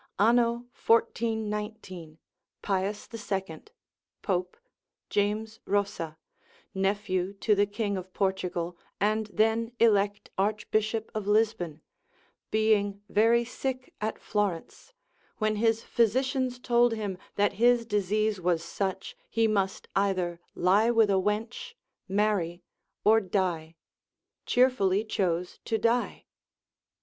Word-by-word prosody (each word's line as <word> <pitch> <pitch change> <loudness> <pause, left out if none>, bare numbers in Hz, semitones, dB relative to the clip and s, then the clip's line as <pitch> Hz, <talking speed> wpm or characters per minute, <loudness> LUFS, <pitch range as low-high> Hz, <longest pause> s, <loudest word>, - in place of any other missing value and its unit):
Anno 235 +3 +3 0.2
1419. 210 -7 -1 0.5
Pius 200 +1 -1
2, 195 -7 -4 0.6
Pope, 180 -2 -1 0.5
James 215 +2 -1
Rossa, 195 -6 -1 0.6
nephew 195 -1 0
to 210 +2 +1
the 205 0 +3
King 205 -1 -2
of 185 0 -7
Portugal, 180 -3 -2 0.2
and 215 +2 +1
then 225 +2 +1
elect 205 -2 +2
Archbishop 215 +2 0
of 215 -2 -4
Lisbon, 205 -7 +1 0.7
being 205 -2 +1
very 230 +3 +4
sick 255 +1 -4
at 215 +1 -2
Florence, 205 - -3 0.5
when 215 -1 0
his 225 +1 +2
physicians 255 +2 +1
told 240 -1 +3
him, 210 -4 -3 0.2
that 205 0 +2
his 240 -1 +5
disease 210 -1 0
was 170 -2 +1
such, 190 +2 -3
he 225 0 +2
must 195 -3 -1
either 185 -3 0 0.2
lie 200 +6 +3
with 225 -3 +4
a 190 -1 +3
wench, 220 - -3 0.3
marry, 190 -4 0 0.4
or 220 +1 +5
die, 175 -4 -1 0.7
cheerfully 220 -6 +3
chose 180 -4 -1
to 225 - 0
die. 235 +2 0
210 Hz, 105 wpm, -28 LUFS, 190-225 Hz, 0.7 s, his